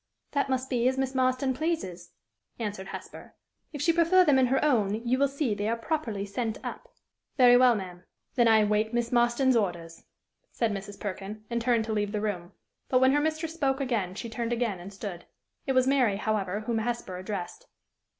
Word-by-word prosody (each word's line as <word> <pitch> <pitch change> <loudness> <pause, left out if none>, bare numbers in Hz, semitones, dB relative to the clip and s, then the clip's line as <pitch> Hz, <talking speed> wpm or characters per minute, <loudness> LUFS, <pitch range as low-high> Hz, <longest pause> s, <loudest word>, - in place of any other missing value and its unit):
"That 280 -1 0
must 260 0 -1
be 245 -2 +1
as 260 +1 +1
Miss 265 0 -1
Marston 260 0 +1
pleases," 250 - -3 0.5
answered 205 -4 -4
Hesper. - - -9 0.4
"If 290 -2 -4
she 335 - +4
prefer 345 +2 +5
them 285 -4 +4
in 255 - +4
her 270 +4 +1
own, 215 -8 +2
you 255 +2 +2
will 280 - +4
see 275 -4 -1
they 205 +1 -2
are 230 - +1
properly 230 -7 -2
sent 220 +2 -3
up." - - -7 0.5
"Very 245 -2 +7
well, 245 -1 +6
ma'am! 180 -3 -7 0.3
Then 240 -3 +3
I 220 -1 +6
wait 215 +2 +1
Miss 240 -1 0
Marston's 240 +2 +3
orders," 175 -6 -2 0.5
said 230 -2 0
Mrs. 205 0 -6
Perkin, 205 +1 -6
and 235 0 0
turned 235 -2 +2
to 220 - -2
leave 205 -1 -1
the 210 - 0
room. 180 -5 -3 0.4
But, 255 - +4
when 260 +1 +5
her 290 +1 +3
mistress 315 +1 -2
spoke 275 -4 0
again, 225 -9 -1
she 235 - -5
turned 230 +1 -3
again 230 -6 -1
and 180 +3 -9
stood. 195 -3 -7 0.4
It 265 - +1
was 255 -1 +4
Mary, 255 -7 +2
however, 210 -2 -1
whom 225 +1 -1
Hesper 235 -5 -3
addressed. 200 - -6
235 Hz, 200 wpm, -28 LUFS, 205-265 Hz, 0.5 s, Very